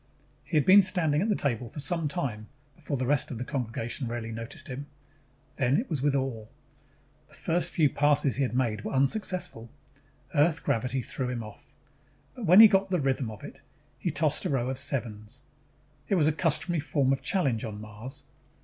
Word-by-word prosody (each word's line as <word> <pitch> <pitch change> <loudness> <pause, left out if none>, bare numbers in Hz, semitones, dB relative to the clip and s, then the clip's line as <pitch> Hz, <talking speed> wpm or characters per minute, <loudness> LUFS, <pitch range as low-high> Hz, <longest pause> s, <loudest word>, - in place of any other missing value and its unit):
He 165 - -1
had 150 - +3
been 195 +2 +8
standing 175 -6 +2
at 215 - 0
the 210 - +2
table 120 -6 -1
for 145 - -9
some 160 +2 0
time 125 -9 -3 0.3
before 150 -4 -4
the 130 - -2
rest 145 +1 +1
of 125 - -5
the 120 - -3
congregation 120 0 -3
really 115 -1 -5
noticed 115 +1 -6
him. 135 +3 -6 0.7
Then 135 0 +2
it 245 - -3
was 145 -5 -1
with 145 0 +1
awe. 130 -5 -2 0.8
The 155 - -15
first 170 +3 0
few 155 -3 +3
passes 145 -2 +2
he - - 0
had 125 -2 -1
made 115 -5 0
were - - -4
unsuccessful. 135 - 0 0.6
Earth 160 +2 +2
gravity 125 -1 -1
threw 130 +1 -3
him 120 -2 -4
off. 105 -1 -13 0.6
But 240 -7 -6
when 185 +6 +9
he 225 - +11
got 195 -1 +1
the 180 -2 +1
rhythm 135 -3 0
of 110 -2 -10
it, - - -10 0.4
he - - -1
tossed - - 0
a - - 0
row 130 -2 0
of 130 - -3
sevens. 115 -6 -2 0.6
It 200 - +1
was 155 -5 +3
a - - +4
customary 155 +1 0
form 140 -3 +1
of 135 - -3
challenge 135 - 0
on 105 -3 -6
Mars. 110 +7 -9
135 Hz, 195 wpm, -28 LUFS, 120-160 Hz, 0.8 s, he